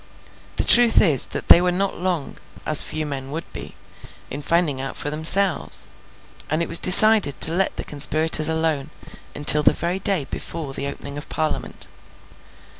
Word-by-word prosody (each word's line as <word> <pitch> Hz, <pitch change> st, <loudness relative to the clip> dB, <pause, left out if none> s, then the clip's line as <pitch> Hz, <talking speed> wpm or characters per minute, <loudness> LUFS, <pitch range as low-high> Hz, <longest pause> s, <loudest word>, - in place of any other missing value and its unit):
The -, -, -3 dB
truth 240 Hz, -1 st, +6 dB
is, 150 Hz, -, +2 dB
that -, -, -8 dB
they 175 Hz, -, +6 dB
were 180 Hz, 0 st, -1 dB
not 195 Hz, +2 st, -4 dB
long 175 Hz, -5 st, -5 dB, 0.3 s
(as 155 Hz, -2 st, +5 dB
few 155 Hz, 0 st, -5 dB
men 135 Hz, -2 st, -8 dB
would 160 Hz, +4 st, -7 dB
be) -, -, -11 dB, 0.6 s
in 140 Hz, -, -8 dB
finding 155 Hz, -4 st, -2 dB
out 135 Hz, -, -8 dB
for 145 Hz, -, -6 dB
themselves; 160 Hz, +3 st, +2 dB, 0.6 s
and 155 Hz, -, -3 dB
it -, -, -7 dB
was -, -, +2 dB
decided 205 Hz, -5 st, +4 dB
to 160 Hz, -, +7 dB
let 190 Hz, +3 st, -2 dB
the -, -, -5 dB
conspirators 155 Hz, +2 st, +1 dB
alone, 160 Hz, -3 st, -4 dB, 0.5 s
until 150 Hz, +1 st, +4 dB
the -, -, +1 dB
very 175 Hz, +3 st, -5 dB
day 195 Hz, -8 st, -2 dB
before 145 Hz, 0 st, -8 dB
the 140 Hz, -, -6 dB
opening 140 Hz, 0 st, -10 dB
of -, -, -13 dB
Parliament. 155 Hz, -1 st, -6 dB
160 Hz, 170 wpm, -19 LUFS, 145-180 Hz, 0.6 s, to